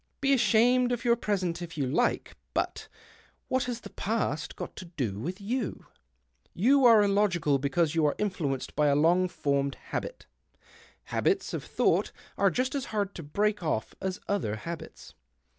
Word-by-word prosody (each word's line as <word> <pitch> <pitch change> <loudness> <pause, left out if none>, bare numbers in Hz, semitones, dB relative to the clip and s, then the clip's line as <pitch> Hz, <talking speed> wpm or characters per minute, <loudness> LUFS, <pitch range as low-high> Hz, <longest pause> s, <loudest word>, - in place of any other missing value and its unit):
Be 275 0 +3
ashamed 245 +1 +4
of 245 0 -2
your 235 -1 +5
present, 185 -7 -2
if 170 -2 -7
you 140 - 0
like, 130 +4 0 0.2
but - - -2 0.6
what 260 0 +1
has 240 -1 -4
the - - -10
past 210 -8 -2
got - - -7
to 185 - -7
do 130 - -3
with 180 - -4
you? 225 +2 -3 0.7
You 260 +7 +4
are 225 -3 +8
illogical 195 -8 +2
because 145 +3 +1
you 165 -1 +2
are 145 - 0
influenced 160 -10 -2
by 150 0 +3
a 140 - +4
lono 175 +5 +4
formed 140 -5 -1
habit. - - -6 0.9
Haljits 390 -1 +1
of - - -3
thouo - - +3
ht - - -11 0.2
are - - +3
just 255 +1 -1
as 275 -3 -2
hard 205 -2 -2
to - - -7
break 205 +8 0
off 155 -10 -2
as 190 +1 -3
other 185 - -1
habits." 165 +10 -8
190 Hz, 170 wpm, -28 LUFS, 150-230 Hz, 0.9 s, are